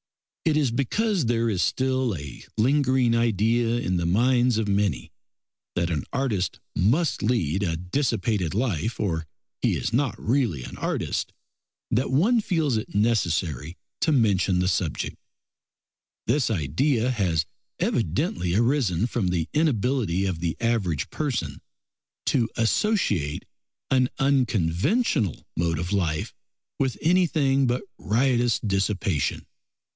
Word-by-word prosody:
It 155 -2 +3
is 140 -6 +2
because 170 - 0
there 115 0 +1
is 100 -5 0
still 130 -4 0
a 70 -4 -9
lingering 130 0 +3
idea 115 +1 +2
in 95 -6 -1
the 85 -1 -1
minds 120 +4 +3
of 110 -2 0
many 100 -11 0 0.6
that 85 0 0
an 75 -4 -1
artist 120 -10 -1 0.2
must 135 - +2
lead 95 -7 0
a 85 -5 -1
dissipated 100 - -1
life 110 - -1
or 80 -5 -1 0.3
he - - +2
is - - -3
not 125 -4 0
really 115 - 0
an - - -8
artist, - - -2 0.6
that 125 +4 +1
one 215 - +3
feels 160 - 0
it 110 - -6
necessary 85 - 0 0.2
to 160 - +2
mention 100 - +2
the 90 0 +1
subject. 90 - -1 1.1
This 145 -5 +1
idea 115 - +1
has 90 -9 0 0.3
evidently 85 0 0
arisen 115 - +2
from 120 -5 -1
the 85 -2 0
inability 125 - +1
of 90 -4 -2
the 85 -2 -2
average 110 -10 0
person 120 - -3 0.6
to 115 -2 +1
associate 115 - +1 0.5
an 130 -1 +3
unconventional 120 - +1
mode 85 -1 0
of 85 +4 -3
life 80 -6 -1 0.5
with 130 -2 0
anything 155 -6 +3
but 120 +1 0 0.2
riotous 120 +1 +2
dissipation. 95 -7 -1
115 Hz, 125 wpm, -25 LUFS, 90-130 Hz, 1.1 s, It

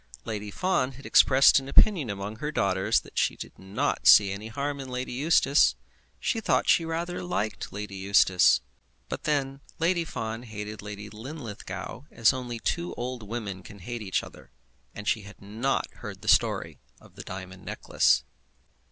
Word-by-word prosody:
Lady 105 -1 -4
Fawn 135 - 0
had 135 +2 -13
expressed 135 +1 +6
an 135 0 -9
opinion 165 - +4
among 100 +2 -5
her 150 +5 -3
daughters 95 -8 +1
that - - -5
she - - +1
did - - -10
not 100 +9 -1
see 100 -2 +8
any 100 +3 -6
harm 140 +5 -3
in 135 -1 -7
Lady 125 0 -4
Eustace. 145 +1 +4 0.4
She 225 - 0
thought - - +2
that - - -4
she 165 - +3
rather 170 +2 -3
liked 110 - -3
Lady 100 0 -6
Eustace. 95 -1 +4 0.5
But - - -5
then 135 -2 -1 0.2
Lady 170 +1 +1
Fawn 115 -7 -5
hated 105 -2 -7
Lady 105 0 -8
Linlithgow 120 +1 -7
as 115 +2 +3
only 125 -2 -5
two 170 +8 -2
old 125 0 -4
women 105 -3 -5
can 100 +2 -12
hate 120 +5 -6
each 95 -3 -1
other; - - -13 0.4
and 105 0 -8
she 110 - +1
had 100 +1 -13
not 110 +7 -1
heard - - -9
the - - -9
story - - +2 0.2
of - - -19
the - - -9
diamond 95 0 -8
necklace. - - +2
115 Hz, 170 wpm, -27 LUFS, 105-140 Hz, 0.5 s, see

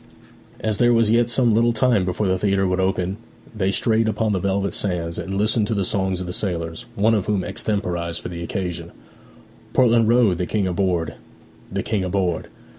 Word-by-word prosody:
As 110 -2 -1
there 120 0 +4
was 115 -2 +3
yet 120 +1 +3
some 120 -2 +3
little 115 +2 +3
time 120 -5 +2
before 90 +3 -1
the 95 -1 +1
theatre 95 -1 +1
would 90 0 0
open, 95 0 0 0.4
they 95 -2 0
strayed 110 +2 +2
upon 110 -1 0
the 95 - 0
velvet 100 +1 -1
sands, 85 -4 -2
and 95 - -4
listened 105 +1 +2
to 115 - -1
the 100 -2 0
songs 95 -1 0
of 90 - -4
the 90 - -5
sailors, 85 -5 -3
one 110 +3 +3
of 105 -4 0
whom 100 -3 0
extemporized 85 -6 -2
for - - -7
the 85 -1 -6
occasion: 85 -2 -4 0.8
'Portland 115 -3 +4
Road 115 -6 +3
the 90 - -1
King 105 -3 0
aboard, 90 -3 0 0.6
the - - -2
King 100 -3 -1
aboard! 90 -3 -1
100 Hz, 190 wpm, -22 LUFS, 90-110 Hz, 0.8 s, there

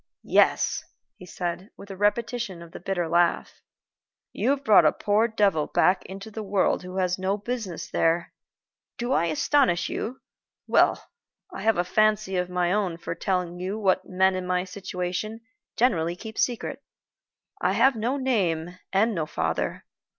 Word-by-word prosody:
"Yes," - - +2 0.3
he 180 - -13
said, 180 +3 -4
with 200 0 -10
a - - -6
repetition 210 -2 -1
of 170 - -14
the - - -9
bitter 180 -1 -2
laugh. 170 +1 +1 0.7
"You - - 0
have 280 0 +1
brought 210 -8 +7
a 155 - +5
poor 210 +2 +1
devil 200 -9 +1
back 185 +1 +2
into 195 +3 -8
the 220 - -5
world 200 -2 +1
who 185 +1 -8
has 185 -1 0
no 190 +2 0
business 210 -5 -5
there. 165 +1 0 0.6
Do 240 +2 -1
I 170 - +2
astonish 175 - +2
you? 250 +4 -4 0.5
Well, - - +3 0.5
I - - -6
have 225 -3 +2
a 175 - +2
fancy 215 +1 +2
of 180 0 -1
my 180 0 +1
own 195 -5 0
for - - -5
telling 180 -2 -2
you 190 +4 -3
what 190 -3 +2
men 190 +1 +3
in 185 -1 -4
my 180 0 +1
situation 185 +3 -4 0.4
generally 170 -8 +2
keep 220 +4 -9
a - - -3
secret. 255 +3 -1 0.8
I - - +2
have 265 -1 +4
no 235 +5 -1
name 180 - -1
and 215 +4 +2
no 160 -5 -2
father. - - -2
190 Hz, 165 wpm, -26 LUFS, 180-220 Hz, 0.8 s, brought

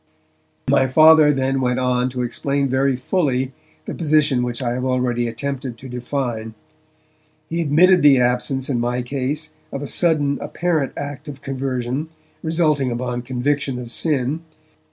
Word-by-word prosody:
My 135 0 +3
Father 155 +2 +7
then 135 -1 0
went 125 -1 +1
on 125 0 +1
to 125 -1 -3
explain 140 +4 -1
very 135 +1 +1
fully 130 -3 0 0.3
the - - -5
position 150 -5 +2
which 120 -1 -3
I 120 -3 -1
have 125 +1 -3
already 125 -2 0
attempted 125 +1 -4
to 130 - -10
define. 120 -3 -4 1.0
He 170 +1 0
admitted 170 +4 +5
the 145 -2 +7
absence 125 +2 0
in 125 -4 0
my 120 +1 -1
case 140 +4 -3 0.2
of 140 - -4
a - - -4
sudden, 150 -5 +1
apparent 160 -6 -1
act 145 +1 -6
of 140 -2 -9
conversion 130 +1 -3 0.3
resulting 155 -5 +1
upon 120 0 -3
conviction 130 +2 -1
of 120 -1 -7
sin. 145 +1 0
135 Hz, 150 wpm, -21 LUFS, 125-145 Hz, 1.0 s, Father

